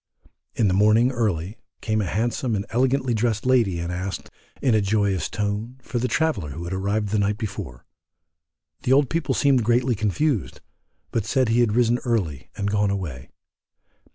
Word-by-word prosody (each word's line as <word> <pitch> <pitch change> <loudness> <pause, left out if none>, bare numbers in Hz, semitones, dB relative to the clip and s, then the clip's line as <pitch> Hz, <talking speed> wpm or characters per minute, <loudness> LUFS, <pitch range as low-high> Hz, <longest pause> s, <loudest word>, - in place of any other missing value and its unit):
In 110 - +2
the 95 - +2
morning, 110 +6 +4
early, 105 -5 -2 0.2
came 110 -1 0
a 100 - -2
handsome 115 +4 -1
and 100 0 -2
elegantly 130 +1 +1
dressed 110 -1 0
lady 120 -8 +3
and 85 +1 -3
asked, 95 +2 -5 0.3
in 130 -4 +2
a 110 - +3
joyous 100 -2 0
tone, 105 +4 -3
for 120 - -3
the 125 - 0
traveller 155 - 0
who 80 +5 -6
had 85 +2 -4
arrived 100 +2 -1
the 105 +1 +1
night 100 +1 +1
before. 80 - -6 1.0
The 130 - +2
old 140 -2 +3
people 165 -1 0
seemed 135 -4 +3
greatly 120 +2 +2
confused, 110 - -1 0.5
but 110 -3 -1
said 130 0 +2
he 115 +1 +3
had 115 -3 +3
risen 120 0 +3
early 100 - -2
and 100 0 -1
gone 105 0 +2
away. 80 -10 -4
110 Hz, 175 wpm, -23 LUFS, 100-120 Hz, 1.0 s, morning